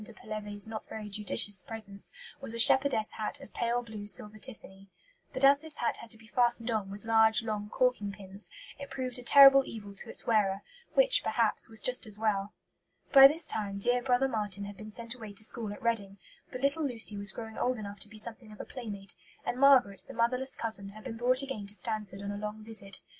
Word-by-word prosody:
de 230 Hz, -, -8 dB
Pelevé's 210 Hz, -1 st, -3 dB
not 220 Hz, -1 st, -7 dB
very 215 Hz, -1 st, -7 dB
judicious 205 Hz, -1 st, -1 dB
presents 205 Hz, -1 st, -8 dB, 0.3 s
was 230 Hz, -4 st, +2 dB
"a -, -, -5 dB
shepherdess 260 Hz, -3 st, +3 dB
hat 220 Hz, +6 st, -3 dB
of 275 Hz, -, -14 dB
pale 240 Hz, +1 st, -1 dB
blue 215 Hz, -3 st, -8 dB
silver 210 Hz, +1 st, -1 dB
tiffany." 195 Hz, -2 st, -9 dB, 0.4 s
But 260 Hz, 0 st, +2 dB
as 280 Hz, +1 st, +6 dB
this 315 Hz, 0 st, -9 dB
hat 235 Hz, -, -1 dB
had 235 Hz, -, -11 dB
to 225 Hz, -, -8 dB
be 225 Hz, -, -18 dB
fastened 240 Hz, 0 st, +1 dB
on 210 Hz, -3 st, -2 dB
with 200 Hz, +2 st, -9 dB
"large, 220 Hz, 0 st, +4 dB
long 210 Hz, -2 st, -4 dB
corking 250 Hz, -5 st, 0 dB
pins," 195 Hz, +1 st, -9 dB, 0.3 s
it 280 Hz, -, -8 dB
proved 255 Hz, -2 st, -4 dB
"a -, -, -8 dB
terrible 275 Hz, +2 st, +9 dB
evil" 205 Hz, -5 st, -9 dB
to 200 Hz, -, -10 dB
its -, -, -7 dB
wearer; 205 Hz, -4 st, +1 dB, 0.3 s
which, -, -, +5 dB
perhaps, -, -, 0 dB
was 220 Hz, -1 st, -1 dB
just 250 Hz, +2 st, +2 dB
as 210 Hz, -1 st, -5 dB
well! 205 Hz, -2 st, -1 dB, 0.6 s
By 270 Hz, -1 st, +11 dB
this 315 Hz, +4 st, +6 dB
time 200 Hz, -2 st, -3 dB
dear 245 Hz, +5 st, +3 dB
brother 250 Hz, +1 st, +2 dB
Marten 205 Hz, -4 st, -3 dB
had 200 Hz, 0 st, -8 dB
been 215 Hz, +1 st, -10 dB
sent 230 Hz, +2 st, -4 dB
away 220 Hz, -5 st, -10 dB
to 200 Hz, -, -4 dB
school 220 Hz, -1 st, -2 dB
at 205 Hz, -, -10 dB
Reading; 205 Hz, -4 st, -1 dB, 0.3 s
but 255 Hz, -, -6 dB
little 280 Hz, +3 st, +1 dB
Lucy 230 Hz, -6 st, 0 dB
was 200 Hz, 0 st, +2 dB
growing 220 Hz, +1 st, -8 dB
old 250 Hz, 0 st, 0 dB
enough 205 Hz, -1 st, -8 dB
to 210 Hz, -, -7 dB
be 215 Hz, -, -13 dB
something 225 Hz, +1 st, -7 dB
of 210 Hz, -, -13 dB
a -, -, -6 dB
playmate; 205 Hz, -6 st, -7 dB, 0.3 s
and 245 Hz, -, -3 dB
Margaret, 260 Hz, -8 st, +5 dB
the 270 Hz, -, -10 dB
motherless 250 Hz, +3 st, 0 dB
cousin, 220 Hz, -4 st, -1 dB
had 215 Hz, +2 st, -13 dB
been 230 Hz, -3 st, -6 dB
brought 255 Hz, +3 st, +2 dB
again 265 Hz, -7 st, -6 dB
to 205 Hz, -, -3 dB
Stanford 210 Hz, -4 st, -3 dB
on 200 Hz, -, -4 dB
a 205 Hz, -, -5 dB
long 210 Hz, +1 st, -6 dB
visit. 200 Hz, -3 st, -4 dB
220 Hz, 220 wpm, -30 LUFS, 205-245 Hz, 0.6 s, By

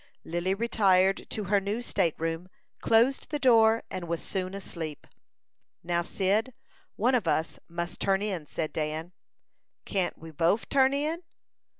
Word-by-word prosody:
Lily 175 Hz, +3 st, -1 dB
retired 195 Hz, -4 st, +2 dB
to 215 Hz, -, -3 dB
her 200 Hz, +1 st, +2 dB
new 200 Hz, +3 st, -2 dB
state 180 Hz, -8 st, +1 dB
room, 165 Hz, +2 st, -3 dB, 0.3 s
closed 235 Hz, +4 st, +3 dB
the 295 Hz, -, -1 dB
door, 230 Hz, -4 st, +5 dB
and 185 Hz, -2 st, -5 dB
was 170 Hz, 0 st, -1 dB
soon 185 Hz, 0 st, -4 dB
asleep. 165 Hz, -6 st, -5 dB, 0.8 s
"Now, 170 Hz, 0 st, 0 dB
Cyd, 205 Hz, +7 st, 0 dB, 0.4 s
one 245 Hz, +5 st, +2 dB
of 245 Hz, -4 st, +1 dB
us 160 Hz, -, 0 dB
must 170 Hz, +1 st, -4 dB
turn 195 Hz, 0 st, +1 dB
in," 185 Hz, -8 st, -3 dB
said 155 Hz, +1 st, -3 dB
Dan. 155 Hz, +2 st, -3 dB, 0.7 s
"Can't 190 Hz, -3 st, -1 dB
we 160 Hz, 0 st, -10 dB
bof 170 Hz, +8 st, +1 dB
turn 270 Hz, 0 st, +4 dB
in?" 310 Hz, +4 st, -1 dB
190 Hz, 145 wpm, -28 LUFS, 170-225 Hz, 0.8 s, door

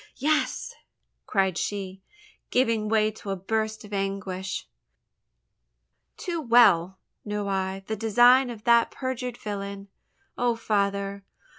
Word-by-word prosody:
"Yes!" 305 Hz, +3 st, 0 dB, 0.5 s
cried 190 Hz, -3 st, +1 dB
she, 195 Hz, -2 st, -4 dB, 0.5 s
giving 230 Hz, -4 st, +1 dB
way 215 Hz, -1 st, +3 dB
to 210 Hz, -1 st, -10 dB
a 195 Hz, -, 0 dB
burst 220 Hz, +3 st, -2 dB
of 205 Hz, -, -11 dB
anguish, 195 Hz, -1 st, -3 dB, 1.5 s
"too 345 Hz, -5 st, -3 dB
well 200 Hz, -, +5 dB, 0.3 s
know 210 Hz, -1 st, -3 dB
I 190 Hz, 0 st, -2 dB
the 220 Hz, -, -3 dB
design 240 Hz, +4 st, +5 dB
of 225 Hz, -3 st, -8 dB
that 235 Hz, -1 st, +4 dB
perjured 250 Hz, -2 st, -4 dB
villain. 200 Hz, -1 st, -6 dB, 0.5 s
O 240 Hz, -1 st, +2 dB
father! 200 Hz, -2 st, -1 dB
210 Hz, 115 wpm, -26 LUFS, 195-235 Hz, 1.5 s, well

